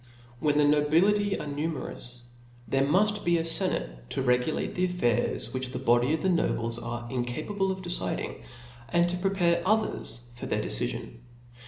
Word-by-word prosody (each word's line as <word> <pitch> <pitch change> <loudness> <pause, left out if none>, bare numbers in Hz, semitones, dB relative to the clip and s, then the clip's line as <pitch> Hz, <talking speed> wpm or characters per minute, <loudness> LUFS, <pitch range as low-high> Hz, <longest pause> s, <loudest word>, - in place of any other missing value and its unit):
When 150 +1 +2
the 150 - +5
nobility 170 +8 +3
are - - -5
numerous, 145 -4 -5 0.5
there 135 +4 +1
muft 205 +9 +2
be 175 0 +3
a 165 - 0
fenate - - -1
to 135 - -2
regulate 125 +4 +1
the 180 - +1
affairs 175 -11 0
which 130 -1 -3
the - - -2
body 125 +1 +3
of 155 - -6
nobles 120 -10 0
are 120 0 -5
incapable 155 +11 -1
of 190 0 -5
deciding, 175 - -3 0.5
and 170 +6 +3
to 175 - -1
prepare 180 -2 +2
tjthers 170 - -1
for 120 - -6
their - - 0
decifion. 115 - -2
150 Hz, 155 wpm, -28 LUFS, 120-180 Hz, 0.5 s, the